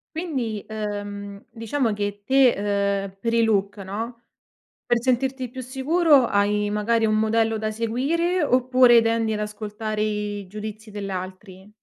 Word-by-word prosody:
Quindi, 260 Hz, -, -3 dB
ehm, 205 Hz, -2 st, -5 dB
diciamo 230 Hz, +1 st, -1 dB
che 205 Hz, 0 st, -4 dB
te, 270 Hz, -1 st, +5 dB, 0.6 s
ehm, 195 Hz, -1 st, -9 dB
per 230 Hz, +2 st, -1 dB
il 230 Hz, 0 st, +3 dB
look 205 Hz, -2 st, +1 dB
no, 225 Hz, +5 st, -6 dB, 0.6 s
per 240 Hz, -1 st, +1 dB
sentirti 260 Hz, +1 st, 0 dB
più 260 Hz, +1 st, -7 dB
sicuro 275 Hz, +2 st, +3 dB
hai 205 Hz, 0 st, +1 dB
magari 220 Hz, +2 st, +1 dB
un 215 Hz, -, +2 dB
modello 220 Hz, 0 st, +1 dB
da 215 Hz, 0 st, -2 dB
seguire 290 Hz, +11 st, 0 dB
oppure 255 Hz, -2 st, +5 dB
tendi 225 Hz, -1 st, +1 dB
ad 210 Hz, -, -2 dB
ascoltare 210 Hz, 0 st, -4 dB
i 210 Hz, -1 st, -3 dB
giudizi 215 Hz, +2 st, -8 dB
dell'altri? 190 Hz, -1 st, -7 dB
220 Hz, 135 wpm, -23 LUFS, 205-250 Hz, 0.6 s, te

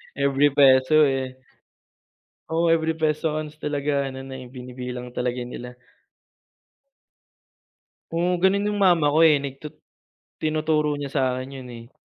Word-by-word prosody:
every 140 Hz, +1 st, +3 dB
peso, 135 Hz, +2 st, +5 dB
eh. 130 Hz, -1 st, -3 dB, 1.1 s
Oo, 165 Hz, +1 st, +1 dB
every 160 Hz, 0 st, +2 dB
peso 155 Hz, 0 st, -1 dB
counts 155 Hz, 0 st, -5 dB
talaga 145 Hz, -1 st, -1 dB
ano 130 Hz, 0 st, -6 dB
na, 135 Hz, 0 st, -8 dB
eh, 130 Hz, -, -9 dB
binibilang 125 Hz, 0 st, -7 dB
talaga 125 Hz, 0 st, -3 dB
nila. 125 Hz, 0 st, -7 dB, 2.4 s
Oo, 175 Hz, +1 st, +1 dB
gano'n 200 Hz, +2 st, +3 dB
yung 210 Hz, -, -2 dB
mama 170 Hz, -4 st, +4 dB
ko, 155 Hz, -, +3 dB
eh. 150 Hz, -3 st, +5 dB
Nagtut 140 Hz, +2 st, -7 dB, 0.7 s
tinuturo 155 Hz, -1 st, 0 dB
niya 145 Hz, -1 st, -6 dB
sa 140 Hz, -, 0 dB
akin 130 Hz, +1 st, -6 dB
yun, 125 Hz, -, -10 dB
eh. 115 Hz, +1 st, -11 dB
140 Hz, 135 wpm, -23 LUFS, 130-155 Hz, 2.4 s, peso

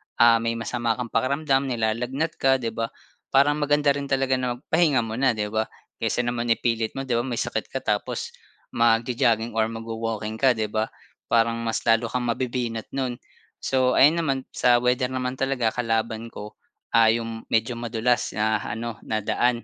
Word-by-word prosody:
ah, 115 Hz, -1 st, +6 dB
may 115 Hz, 0 st, -1 dB
masama 115 Hz, 0 st, -1 dB
kang 120 Hz, -1 st, -5 dB
pakiramdam, 135 Hz, +2 st, +1 dB
nilalagnat 125 Hz, +6 st, -1 dB
ka, 135 Hz, 0 st, +4 dB
'di 115 Hz, -3 st, -2 dB
ba? 115 Hz, +1 st, -2 dB, 0.4 s
Parang 145 Hz, +2 st, +4 dB
maganda 145 Hz, 0 st, +3 dB
rin 140 Hz, 0 st, -3 dB
talaga 135 Hz, -1 st, +1 dB
na 125 Hz, -1 st, -1 dB
magpahinga 140 Hz, -1 st, +2 dB
muna, 115 Hz, +3 st, +1 dB
'di 105 Hz, -1 st, -2 dB
ba? 110 Hz, 0 st, 0 dB, 0.3 s
Kaysa 125 Hz, -, 0 dB
naman 120 Hz, 0 st, -2 dB
ipilit 115 Hz, -1 st, 0 dB
mo, 135 Hz, -, -3 dB
'di 125 Hz, -3 st, -1 dB
ba? -, -, -1 dB
May 120 Hz, -2 st, -2 dB
sakit -, -, -2 dB
ka -, -, -2 dB
tapos -, -, -2 dB, 0.4 s
magjo-jogging 115 Hz, 0 st, +2 dB
or 110 Hz, 0 st, +1 dB
magwa-walking 115 Hz, -1 st, -4 dB
ka, 130 Hz, -2 st, +4 dB
'di 110 Hz, -1 st, -2 dB
ba? 110 Hz, 0 st, 0 dB, 0.4 s
Parang 115 Hz, 0 st, +2 dB
mas 115 Hz, -1 st, -2 dB
lalo 115 Hz, 0 st, +3 dB
kang 125 Hz, +2 st, -2 dB
mabibinat 120 Hz, -2 st, -2 dB
no'n. 130 Hz, -3 st, -2 dB, 0.4 s
So, 130 Hz, -1 st, +2 dB
ayun 150 Hz, +5 st, +6 dB
naman 140 Hz, -5 st, 0 dB, 0.2 s
sa 120 Hz, -1 st, +4 dB
weather 125 Hz, +1 st, +2 dB
naman 130 Hz, 0 st, -3 dB
talaga 135 Hz, -4 st, +1 dB
kalaban 115 Hz, -1 st, -1 dB
ko, 105 Hz, +1 st, -9 dB, 0.3 s
ah, 115 Hz, -1 st, +5 dB
yung 115 Hz, 0 st, -1 dB
medyo 115 Hz, +2 st, 0 dB
madulas 120 Hz, 0 st, 0 dB
na 110 Hz, 0 st, +1 dB
ano 115 Hz, 0 st, -5 dB
na 110 Hz, -1 st, -1 dB
daan 120 Hz, +2 st, +1 dB
120 Hz, 175 wpm, -24 LUFS, 115-130 Hz, 0.4 s, ah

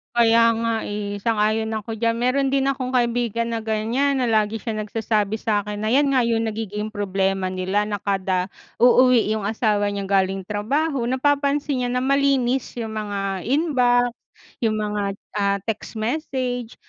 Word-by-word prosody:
Kaya 230 Hz, 0 st, +5 dB
nga, 230 Hz, 0 st, 0 dB
eh. 205 Hz, 0 st, -4 dB
Sang-ayon 220 Hz, 0 st, +1 dB
ako 220 Hz, +1 st, -4 dB
diyan. 230 Hz, +1 st, +1 dB
Meron 265 Hz, +2 st, +1 dB
din 275 Hz, 0 st, +2 dB
akong 260 Hz, -2 st, -2 dB
kaibigan 235 Hz, -2 st, 0 dB
na 230 Hz, -1 st, -3 dB
ganiyan 235 Hz, +6 st, 0 dB
na 250 Hz, -, +1 dB
lagi 220 Hz, 0 st, +1 dB
siyang 215 Hz, -1 st, -3 dB
nagsasabi 215 Hz, -1 st, -1 dB
sa'kin 210 Hz, -1 st, -1 dB
na 215 Hz, -, -1 dB
'yan 275 Hz, +4 st, +3 dB
nga 260 Hz, -, +4 dB
yung 230 Hz, -1 st, +1 dB
nagiging 215 Hz, -1 st, -4 dB
problema 195 Hz, -2 st, -1 dB
nila. 190 Hz, +3 st, -1 dB
Na 205 Hz, -, -1 dB
kada 190 Hz, -1 st, -1 dB, 0.2 s
uuwi 250 Hz, 0 st, +5 dB
yung 215 Hz, -2 st, -2 dB
asawa 210 Hz, -2 st, +1 dB
niya 200 Hz, -1 st, -3 dB
galing 195 Hz, -1 st, +1 dB
trabaho, 240 Hz, -, -1 dB
napapansin 280 Hz, +1 st, +1 dB
niya 245 Hz, -, -1 dB
na 250 Hz, -, 0 dB
malinis 270 Hz, -2 st, +1 dB
yung 225 Hz, -2 st, -4 dB
mga 200 Hz, -3 st, -3 dB
inbox, 250 Hz, -5 st, +2 dB, 0.5 s
yung 220 Hz, -3 st, +1 dB
mga, 210 Hz, -1 st, -2 dB, 0.4 s
ah, 200 Hz, -1 st, +2 dB
text 220 Hz, +1 st, -4 dB
message. 245 Hz, 0 st, -3 dB
225 Hz, 155 wpm, -22 LUFS, 210-250 Hz, 0.5 s, Kaya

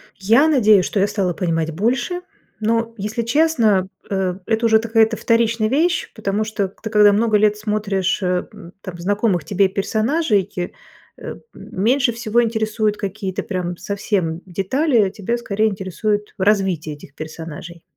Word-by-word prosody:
Я 225 Hz, +10 st, +4 dB
надеюсь, 215 Hz, -, +4 dB
что 200 Hz, -, -1 dB
я 200 Hz, -, +3 dB
стала 190 Hz, -5 st, -1 dB
понимать 165 Hz, -2 st, -1 dB
больше, 240 Hz, -, -1 dB, 0.4 s
но, 230 Hz, +1 st, 0 dB
если 215 Hz, +3 st, -3 dB
честно, 230 Hz, -, +2 dB, 0.2 s
э, 190 Hz, -1 st, -1 dB
это 225 Hz, +1 st, 0 dB
уже 220 Hz, -1 st, +5 dB
какая-то 225 Hz, 0 st, +2 dB
вторичная 230 Hz, -1 st, +1 dB
вещь, 335 Hz, +7 st, +1 dB
потому 210 Hz, 0 st, -1 dB
что 210 Hz, -2 st, -2 dB
ты, 220 Hz, +3 st, -8 dB
когда 210 Hz, -1 st, +5 dB
много 215 Hz, 0 st, +3 dB
лет 210 Hz, 0 st, +2 dB
смотришь, 210 Hz, -3 st, -1 dB
эм, 180 Hz, 0 st, -3 dB
там 185 Hz, -3 st, -8 dB
знакомых 200 Hz, -2 st, 0 dB
тебе 195 Hz, +2 st, +2 dB
персонажей, 215 Hz, -, 0 dB, 0.7 s
э, -, -, -7 dB, 0.2 s
меньше 240 Hz, +6 st, 0 dB
всего 230 Hz, 0 st, +1 dB
интересуют 220 Hz, -1 st, -1 dB
какие-то 195 Hz, -1 st, -4 dB
прям 180 Hz, -3 st, -3 dB
совсем 195 Hz, -5 st, -2 dB
детали, 210 Hz, -, +1 dB
тебя 220 Hz, +4 st, -2 dB
скорее 220 Hz, -2 st, 0 dB
интересует 205 Hz, +2 st, -2 dB
развитие 190 Hz, -6 st, +1 dB
этих 145 Hz, -1 st, -15 dB
персонажей. 160 Hz, +1 st, -8 dB
210 Hz, 140 wpm, -20 LUFS, 190-230 Hz, 0.7 s, уже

